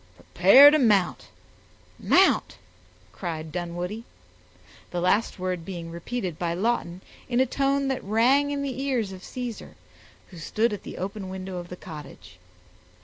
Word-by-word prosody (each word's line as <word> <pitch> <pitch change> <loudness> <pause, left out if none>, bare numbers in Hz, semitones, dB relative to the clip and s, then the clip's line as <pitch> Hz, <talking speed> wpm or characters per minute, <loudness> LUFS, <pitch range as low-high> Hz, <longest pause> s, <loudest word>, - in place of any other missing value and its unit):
"Prepare 285 +2 +7
to 310 - +3
mount 210 -8 +2 0.7
mount!" - - +3 0.5
cried 160 - -6
Dunwoodie; 175 +5 -4 0.9
the 175 - -3
last 190 +6 +1
word 185 -2 -3
being 170 -2 -7
repeated 175 0 -5
by 170 -1 -1
Lawton 185 -3 -1 0.3
in 245 0 +1
a 260 - +4
tone 275 +2 0
that 265 - -2
rang 245 +8 +3
in 285 -1 -2
the 265 -2 -4
ears 250 -8 -1
of 185 -1 -10
Caesar, 245 -3 -7 0.5
who 180 - -12
stood 215 +7 0
at 205 - -5
the - - -9
open 195 +1 -5
window 190 0 -6
of 175 0 -7
the 180 - -8
cottage. 150 - -11
190 Hz, 145 wpm, -25 LUFS, 175-245 Hz, 0.9 s, Prepare